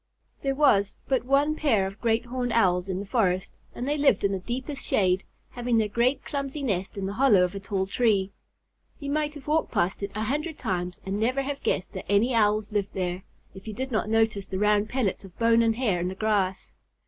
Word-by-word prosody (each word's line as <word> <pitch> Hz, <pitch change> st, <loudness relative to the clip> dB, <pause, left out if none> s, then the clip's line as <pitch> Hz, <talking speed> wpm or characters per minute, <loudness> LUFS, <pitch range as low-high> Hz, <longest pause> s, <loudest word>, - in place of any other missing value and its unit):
There 270 Hz, -1 st, 0 dB
was 205 Hz, -9 st, +3 dB
but 255 Hz, -3 st, +1 dB
one 280 Hz, +3 st, +2 dB
pair 230 Hz, -12 st, +2 dB
of 195 Hz, +2 st, -7 dB
Great 230 Hz, 0 st, +1 dB
Horned 245 Hz, -1 st, -2 dB
Owls 180 Hz, -4 st, +2 dB
in 185 Hz, 0 st, -2 dB
the -, -, -6 dB
forest, 190 Hz, -4 st, 0 dB, 0.2 s
and 245 Hz, -, -4 dB
they 295 Hz, +1 st, 0 dB
lived 285 Hz, -, +3 dB
in 200 Hz, -, +2 dB
the 195 Hz, -, -1 dB
deepest 260 Hz, +7 st, -5 dB
shade, 185 Hz, -1 st, +2 dB, 0.3 s
having 245 Hz, -1 st, 0 dB
their 220 Hz, -1 st, +2 dB
great 235 Hz, +6 st, +1 dB
clumsy 280 Hz, 0 st, -4 dB
nest 195 Hz, -6 st, -2 dB
in 195 Hz, -, -2 dB
the 195 Hz, -, -3 dB
hollow 220 Hz, -6 st, +5 dB
of 180 Hz, -, -1 dB
a 200 Hz, -, -5 dB
tall 195 Hz, -1 st, -2 dB
tree. 200 Hz, -2 st, +1 dB, 0.7 s
You 280 Hz, -1 st, -4 dB
might 300 Hz, 0 st, -1 dB
have 280 Hz, -3 st, -10 dB
walked 310 Hz, +1 st, 0 dB
past 175 Hz, +4 st, 0 dB
it 200 Hz, -, -2 dB
a 215 Hz, -, -1 dB
hundred 300 Hz, +7 st, -2 dB
times 180 Hz, -1 st, -3 dB
and 195 Hz, +2 st, -2 dB
never 255 Hz, +5 st, +1 dB
have 280 Hz, +1 st, -4 dB
guessed 185 Hz, -, -1 dB
that -, -, -6 dB
any 225 Hz, +5 st, +3 dB
Owls 215 Hz, -1 st, +2 dB
lived 205 Hz, -2 st, -2 dB
there, 180 Hz, -1 st, -2 dB, 0.3 s
if 195 Hz, +2 st, -12 dB
you 215 Hz, -, -5 dB
did 260 Hz, +3 st, -4 dB
not 215 Hz, -2 st, 0 dB
notice 220 Hz, -3 st, +1 dB
the 190 Hz, -, -4 dB
round 210 Hz, +1 st, +2 dB
pellets 245 Hz, -8 st, -1 dB
of 190 Hz, -3 st, -14 dB
bone 230 Hz, 0 st, +4 dB
and 225 Hz, -1 st, +2 dB
hair 220 Hz, -8 st, 0 dB
on 175 Hz, -, -1 dB
the 185 Hz, -, -4 dB
grass. 195 Hz, -3 st, -1 dB
215 Hz, 225 wpm, -26 LUFS, 195-260 Hz, 0.7 s, hollow